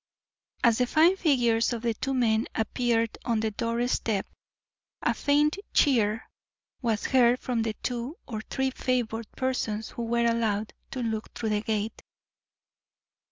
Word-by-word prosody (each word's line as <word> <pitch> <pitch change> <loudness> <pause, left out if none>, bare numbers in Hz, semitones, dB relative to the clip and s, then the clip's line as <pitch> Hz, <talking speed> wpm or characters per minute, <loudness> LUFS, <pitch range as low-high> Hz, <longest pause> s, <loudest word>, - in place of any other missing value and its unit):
As 235 -1 +4
the 250 - +2
fine 325 +7 +5
figures 245 -9 +2
of 235 -1 -5
the 235 -1 +1
two 270 +5 -2
men 225 -3 +2
appeared 230 0 0
on 235 -2 +1
the 220 0 0
doorstep, 230 -2 -1 0.8
a - - +2
faint 295 +4 +2 0.2
cheer 225 -6 +3 0.5
was 225 -4 0
heard 250 -2 +4
from 245 -3 -1
the 225 -1 -1
two 250 +6 -3
or 220 -4 -4
three 265 -1 0
favoured 230 -4 -2
persons 225 -4 -2
who 235 - -4
were 235 +1 +1
allowed 220 -2 0 0.2
to 255 - -4
look 220 -1 -3
through 220 - -2
the 210 -1 +1
gate. 215 0 -2
235 Hz, 145 wpm, -27 LUFS, 220-255 Hz, 0.8 s, fine